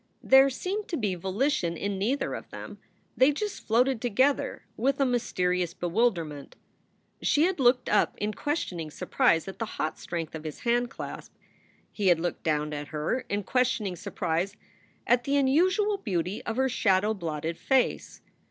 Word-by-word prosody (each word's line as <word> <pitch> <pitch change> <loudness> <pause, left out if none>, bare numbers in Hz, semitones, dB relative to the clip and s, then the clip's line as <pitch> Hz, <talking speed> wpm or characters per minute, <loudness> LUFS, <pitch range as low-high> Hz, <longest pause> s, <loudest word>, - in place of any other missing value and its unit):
There 270 +1 +7
seemed 390 +10 -3
to 335 - -2
be 210 -5 0
volition 190 - -1
in 200 -1 -3
neither 250 +8 0
of - - -7
them; - - -9 0.4
they 260 +3 +5
just 415 +8 -5
floated 245 +2 +2
together 260 +5 +1
with 270 +5 0
a 275 - +4
mysterious 180 -8 0
bewilderment. 175 - -1 0.7
She 295 - +3
had 360 -1 +1
looked 250 -1 +4
up 210 - +2
in 210 +1 -2
questioning 185 - -3
surprise 165 +2 +1
at 195 0 -8
the 225 - -2
hot 155 - -2
strength 165 -2 -4
of 160 -1 -6
his 155 -2 -7
handclasp. 240 0 -2 0.6
He 205 -3 -1
had 175 -3 +5
looked 175 +1 -3
down 150 -1 0
at 145 0 -5
her 155 - -1
in 205 0 -1
questioning 230 -5 0
surprise 175 +3 -2 0.5
at 245 +1 +3
the 280 +2 0
unusual 370 +10 +3
beauty 185 - -2
of 225 - -2
her 265 0 +3
shadow 210 -4 +2
blotted 165 -4 -3
face. 265 -2 0
215 Hz, 160 wpm, -28 LUFS, 175-265 Hz, 0.7 s, There